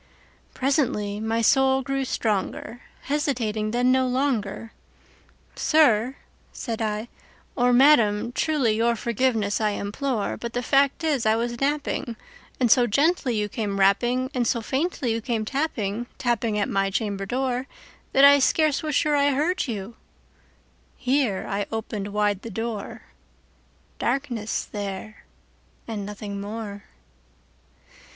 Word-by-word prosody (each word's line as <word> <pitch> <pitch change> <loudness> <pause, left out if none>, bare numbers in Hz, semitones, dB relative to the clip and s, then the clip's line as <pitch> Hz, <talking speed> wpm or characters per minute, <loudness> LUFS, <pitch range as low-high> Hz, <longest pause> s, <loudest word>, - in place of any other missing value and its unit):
Presently 255 -7 0
my 225 +1 -1
soul 265 +2 +4
grew 275 0 -1
stronger; 225 +1 -2 0.2
hesitating 240 -7 -1
then 245 +3 +2
no 260 0 +3
longer,"Sir," 250 +1 -1 0.4
said 230 -3 -5
I, 215 +1 -2 0.5
"or 245 -1 +3
Madam, 240 -5 +4
truly 280 -3 +1
your 230 +1 +2
forgiveness 225 -2 0
I 215 - +2
implore; 215 +2 -2
But 235 0 -6
the 245 - -2
fact 275 +4 +2
is 285 -8 +1
I 220 - +4
was 235 +1 -3
napping, 280 -4 -1 0.4
and 245 -4 +3
so 245 0 +5
gently 280 - +2
you 210 -1 0
came 205 -2 -3
rapping, 245 +7 +2
And 245 -2 0
so 235 - +1
faintly 265 +1 -1
you 225 - -2
came 220 -1 -2
tapping, 240 -5 -2
tapping 230 -3 0
at 205 - +1
my 195 0 0
chamber 200 -1 -2
door, 255 +2 -1 0.4
That 275 +1 +6
I 285 0 +8
scarce 305 +2 +2
was 305 -2 -2
sure 300 -1 +2
I 285 0 +3
heard 315 +7 0
you"—here 230 +2 -5
I 200 0 -2
opened 220 -2 -4
wide 205 -1 0
the 230 - -7
door:—Darkness 225 +2 -5
there 205 +1 -6 0.6
and 210 -3 -4
nothing 205 -1 -6
more. 205 -1 -6
235 Hz, 125 wpm, -24 LUFS, 210-270 Hz, 0.6 s, I